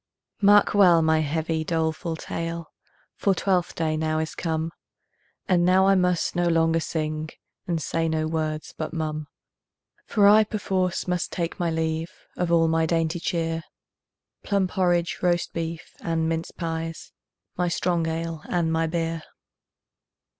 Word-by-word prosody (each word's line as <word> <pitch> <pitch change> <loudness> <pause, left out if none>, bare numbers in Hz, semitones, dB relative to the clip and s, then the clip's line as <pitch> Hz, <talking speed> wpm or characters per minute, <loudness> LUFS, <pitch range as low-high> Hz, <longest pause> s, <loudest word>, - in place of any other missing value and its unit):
Mark 205 0 +6
well 180 -5 +6
my 160 0 +3
heavy, 160 +1 -1
doleful 160 0 -1
tale, 165 0 -5 0.5
For 195 -2 +2
Twelfth 185 -3 0
day 160 -1 0
now 155 0 0
is 160 0 -2
come, 160 -1 -2 0.8
And 175 -2 +3
now 185 +2 +5
I 195 - +5
must 180 -3 +1
no 175 0 +2
longer 165 -1 +3
sing, 155 0 -3 0.4
And 170 -2 0
say 165 +1 -1
no 160 0 0
words 155 -1 -3
but 155 - -4
mum; 155 -2 -3 0.8
For 205 -2 +4
I 215 +1 +7
perforce 190 -5 -1
must 180 -1 -1
take 170 -2 -3
my 175 -1 +1
leave 160 +1 -1 0.3
Of 175 -1 -1
all 165 -1 +4
my 160 0 +2
dainty 165 0 0
cheer, 165 -1 -1 0.8
Plum 200 -2 +1
porridge, 175 -3 +1
roast 175 -1 +1
beef, 165 -1 -5
and 165 -1 0
minced 165 0 -3
pies, 165 -1 -4 0.4
My 180 0 0
strong 170 -1 0
ale 165 0 -3
and 165 -2 +1
my 165 0 +1
beer. 165 0 -2
165 Hz, 145 wpm, -25 LUFS, 160-175 Hz, 0.8 s, I